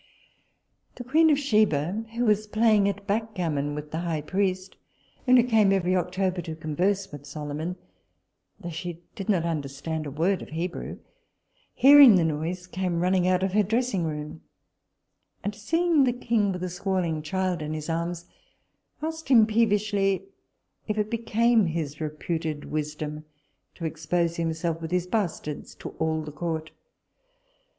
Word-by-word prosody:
The 245 - -7
queen 315 +6 +4
of 295 - +4
Sheba, 215 - +1
who 240 +1 +1
was 215 -1 +2
playing 215 -2 +3
at 200 0 -5
backgammon 180 -9 -1
with 150 0 -7
the 160 - -2
high 165 -3 -2
priest, 185 +2 -1 0.5
and 255 0 +7
who 240 - +6
came 220 -5 +4
every 185 -1 +2
October 185 0 -1
to 160 -1 -6
converse 185 +6 -1
with 145 -1 -10
Solomon, 150 +4 -4 0.8
though 175 -4 -6
she 170 +1 -6
did 195 -2 -7
not 185 -5 +3
understand 155 0 -3
a - - -3
word 165 +7 0
of - - -9
Hebrew, 170 +3 -4 0.8
hearing 275 -3 +9
the 175 - +4
noise, 165 +3 -2
came 180 -1 -2
running 180 0 +2
out 185 0 +2
of 190 -1 -1
her 210 - +4
dressing 220 -2 0
room; 150 0 -5 1.0
and 205 - -2
seeing 325 +8 +2
the 245 - +1
king 230 -4 +1
with 180 -1 -4
a 185 - -2
squalling 180 -3 -1
child 180 +2 -1
in 155 +1 -3
his 155 -1 -5
arms, 170 +1 -3 0.8
asked 320 -2 -4
him 230 -5 +7
peevishly, 210 -3 +1 0.6
if 215 -1 -2
it 210 +1 -1
became 230 -2 +2
his 155 -2 -4
reputed 155 0 -3
wisdom 150 0 -4 0.5
to 165 - -6
expose 165 +2 -1
himself 165 0 -2
with 160 - -4
his 180 -1 0
bastards 180 -7 -3
to - - -7
all 160 0 0
the 150 - -7
court? 160 0 -4
180 Hz, 155 wpm, -26 LUFS, 160-210 Hz, 1.0 s, hearing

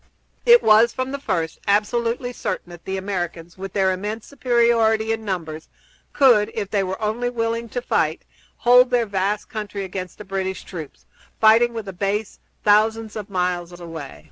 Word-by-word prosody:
It 475 0 +8
was, 220 +2 +6
from 260 0 -3
the 280 - -4
first, 170 - -2
absolutely 235 +4 0
certain 175 - -4
that 175 -1 -12
the 190 0 -3
Americans, 175 -3 -4
with 195 0 -7
their 190 -1 +2
immense 210 +4 -5
superiority 235 -4 +2
in 225 0 -5
numbers, 165 -6 -5 0.4
could, 235 -7 +5
if 205 -3 -3
they 200 -2 +1
were 190 +2 -4
only 220 +3 -1
willing 230 -1 -2
to 245 +2 -4
fight, - - 0 0.3
hold 250 +1 +6
their 245 -2 +2
vast 200 0 -1
country 210 -2 -5
against 185 -1 -6
the 210 - -10
British 190 -1 -3
troops, 160 -6 -9 0.3
fighting 225 +2 +5
with 225 -3 -6
a 195 - -6
base 200 +3 -2 0.2
thousands 215 +1 +2
of 210 -1 -6
miles 180 -2 -2
away. 160 - -8
210 Hz, 170 wpm, -22 LUFS, 190-230 Hz, 0.4 s, It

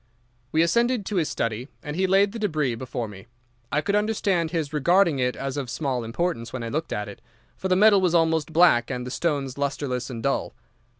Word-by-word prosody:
"We 160 +1 +3
ascended 235 +5 +1
to 205 - -2
his 160 -4 +1
study, 115 +2 -2 0.2
and 150 0 -5
he 190 +2 +1
laid 195 +2 +4
the 230 - -6
débris 155 - 0
before 120 -1 -4
me. 100 +1 -12 0.4
I 150 - +1
could 200 +4 0
understand 205 -5 +1
his 160 -3 -3
regarding 170 +1 +3
it 125 0 0
as 135 +1 -4
of 135 -4 -3
small 130 -2 -2
importance 115 0 -2
when 130 -2 -5
I 115 - -4
looked 155 +6 -3
at 105 0 -2
it, 100 - -10 0.3
for 190 - -3
the 185 - +3
metal 205 0 +6
was 175 -2 +2
almost 160 -2 +2
black 160 -8 +4
and 125 -2 -3
the 125 - -6
stones 140 -4 -2
lustreless 135 -3 -2
and 115 -3 -6
dull. - - -1
150 Hz, 215 wpm, -25 LUFS, 125-180 Hz, 0.4 s, metal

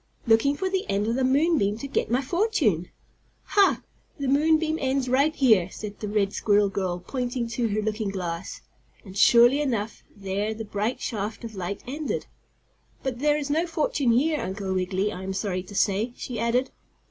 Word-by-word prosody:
"Looking 230 +5 +4
for 380 - -1
the 380 0 -2
end 200 +1 +1
of 230 - 0
the 260 +2 0
moon 295 +5 +3
beam 200 +1 0
to 275 - -6
get - - -1
my 250 +4 +1
fortune." 295 - +1 0.6
"Ha! 400 -2 +4 0.4
The 280 - -2
moon 305 +4 +4
beam 315 0 -1
ends 265 -1 0
right 280 +5 +2
here," 215 -9 +4
said 205 +1 -8
the 210 - -4
red 205 -1 0
squirrel 205 -1 +3
girl, 185 -3 -2
pointing 245 +3 -3
to 235 0 -1
her 215 0 -1
looking 215 -1 -2
glass, 180 -2 -5 0.4
and, 190 -1 -11
surely 240 +7 +6
enough, 230 -6 -2
there 200 +2 -2
the 225 0 -6
bright 210 +4 -2
shaft 210 +1 -4
of 230 -1 -7
light 190 0 -5
ended. 290 +4 -3 0.8
"But 255 -3 -3
there 295 +1 +2
is 290 -1 -3
no 325 +4 +1
fortune 330 - 0
here, 300 +5 +2
Uncle 190 0 -3
Wiggily, 190 +2 0
I 185 - -7
am 190 0 -4
sorry 190 -2 -2
to 195 +2 -12
say," 205 +4 +1
she 240 -4 -5
added. 240 +3 +1
230 Hz, 190 wpm, -25 LUFS, 200-275 Hz, 0.8 s, surely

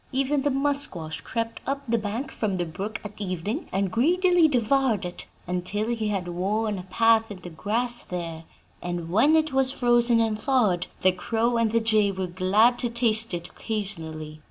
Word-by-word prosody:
Even 275 +2 +1
the 290 - +1
musquash 270 - -1
crept 230 -1 -4
up 275 +1 -2
the 230 0 +1
bank 215 +6 -4
from 205 -4 -2
the 175 - -1
brook 195 +7 -5
at 210 - -6
evening, 200 - -3
and 195 -1 -1
greedily 350 - +4
devoured 245 -5 +1
it, 175 - -7 0.2
until 180 +5 -2
he 225 -2 -1
had 195 -4 -2
worn 200 +4 -1
a - - -7
path 225 +1 +3
in 205 - -7
the 175 - -9
grass 235 +8 0
there; 165 -2 -6 0.4
and 175 -1 -4
when 280 - +4
it 310 -2 +2
was 265 -1 +2
frozen 240 -2 +3
and 220 -2 0
thawed, 215 -10 +1
the 185 - +5
crow 225 +6 -1
and 230 -2 +2
the 230 - +3
jay 215 -3 +2
were 190 -1 -3
glad 195 +7 +2
to 240 - 0
taste 230 -1 +2
it 170 0 -6
occasionally. 160 -8 -5
220 Hz, 180 wpm, -25 LUFS, 185-245 Hz, 0.4 s, the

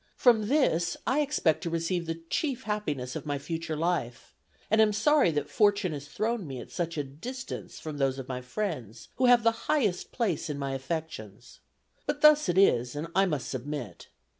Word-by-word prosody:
From 220 -4 +4
this 175 - +2
I 270 - +2
expect 275 - +1
to 170 - -3
receive 170 +1 -1
the 165 0 -4
chief 275 -6 -1
happiness 150 -12 -3
of - - -6
my 145 -1 -1
future 160 +2 -4
life; 155 -7 -2 0.4
and 220 0 +5
am 215 -1 +4
sorry 290 - +4
that 145 -2 -1
fortune 205 -2 +2
has 145 -1 -7
thrown 215 +3 -2
me 135 -2 -6
at - - -10
such 170 -2 -3
a 145 - 0
distance 240 - -7
from 155 -2 -6
those 135 -1 +1
of 135 -1 -6
my 125 -1 -4
friends 125 - -5
who 255 - +3
have 245 -2 +6
the 230 0 0
highest 215 -12 +1
place 185 -9 -1
in 145 - -3
my 140 -1 -3
affections. 135 - -6 0.5
But 295 - -2
thus 300 -6 +6
it 175 - +1
is, 125 -10 +4
and 155 +3 -4
I 195 0 +4
must 150 -7 -2
submit. 130 - -5
165 Hz, 190 wpm, -28 LUFS, 140-215 Hz, 0.5 s, have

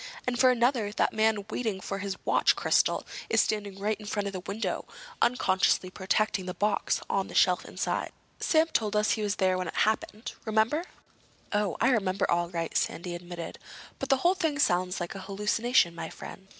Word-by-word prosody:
And, 245 -1 -1
for 260 -1 +6
another, 240 -3 +2
that - - +1
man 220 -2 +2
waiting 220 -6 -2
for 195 +1 -4
his 195 -1 -4
watch - - +4
crystal - - +2 0.2
is - - +3
standing 205 -2 0
right 210 +2 -1
in 210 - -10
front 205 -1 -2
of 200 - -3
the 185 - -3
window, 200 +5 -3 0.4
unconsciously 190 -6 +2
protecting 190 0 0
the 180 - -4
box 210 +1 0
on 195 -1 0
the - - -10
shelf 180 -1 +4
inside. - - -2 0.3
Sam 315 0 +3
told 215 -2 +1
us 210 0 +3
he 220 - 0
was 205 -1 0
there 185 -1 +1
when 180 - -2
it - - -6
happened. 220 +2 0
Remember?" 225 +9 +1 0.7
"Oh, 205 -3 0
I 235 - +4
remember 195 -4 +1
all 170 0 +1
right," 165 -2 -4
Sandy 175 +1 -1
admitted. 175 -1 -7 0.4
"But - - -4
the 270 - +5
whole 355 - +6
thing 320 -6 -1
sounds 180 -8 +1
like 175 -1 -4
a 195 - -7
hallucination, 210 +1 +1
my 170 - -6
friend. 190 - -10
205 Hz, 190 wpm, -28 LUFS, 185-220 Hz, 0.7 s, for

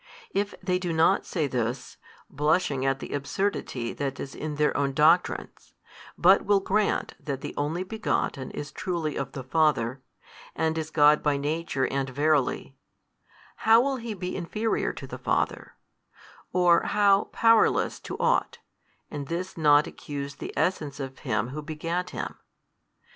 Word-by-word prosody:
If 200 +1 -1
they 180 -1 +1
do 180 -2 -2
not 160 0 +3
say 160 -4 -1
this, 125 -1 -3 0.3
blushing 150 -2 +1
at 135 0 +1
the - - -7
absurdity 140 -5 -2
that 140 -1 -4
is 135 - -6
in 155 -1 -5
their 150 0 +1
own 140 -1 0
doctrines, 160 +5 +1 0.4
but 190 +3 +5
will 205 0 +3
grant 200 +2 0
that 140 -3 -4
the - - -6
Only 155 +5 -1
Begotten 190 -9 -2
is 145 0 -6
truly 165 -2 -3
of 135 -1 -4
the 135 - -6
Father, 135 -3 +1 0.5
and 160 0 0
is 160 -1 -3
God 150 -1 +5
by 145 -2 +1
Nature 145 -1 -1
and 135 -1 -2
Verily: 145 +1 0 0.8
how 225 +1 +6
will 270 +2 +1
He 230 -3 -5
be 180 -1 -4
inferior 210 +5 -1
to - - -9
the - - -8
Father, - - -1 0.8
or 175 -2 +4
how 200 -1 +3
powerless 225 -1 +3
to - - -7
ought, 485 +1 +1 0.5
and 145 -2 -5
this 180 +3 -4
not 150 -2 +5
accuse 140 -1 -6
the - - -6
Essence 150 -6 -1
of 135 -2 -6
Him 120 - -1
Who 150 +4 -5
begat 165 +4 -3
Him? - - -6
155 Hz, 155 wpm, -27 LUFS, 140-180 Hz, 0.8 s, how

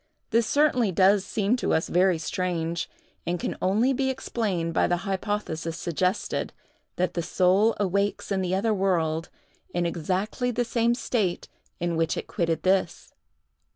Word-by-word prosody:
This 230 -1 +3
certainly 265 -8 +3
does 190 +2 +4
seem 210 +3 0
to - - +1
us 160 - 0
very 180 0 +3
strange, 170 -1 -2 0.4
and 175 0 0
can - - -3
only 220 +8 +2
be 265 +1 0
explained 200 -10 -2
by - - +3
the 175 +2 -1
hypothesis 190 -5 -2
suggested, 180 +3 -1 0.4
that 180 -1 0
the 170 - -1
soul 190 +6 +3
awakes 200 +1 0
in 195 -1 +1
the 185 0 0
other 215 +3 +1
world 170 -5 0 0.5
in 175 0 +1
exactly 185 +8 -1
the 245 0 0
same 235 0 +1
state 215 -8 -1 0.3
in 175 -1 -1
which 165 0 0
it - - -3
quitted 165 -2 -1
this. 185 -2 0
190 Hz, 155 wpm, -26 LUFS, 170-215 Hz, 0.5 s, does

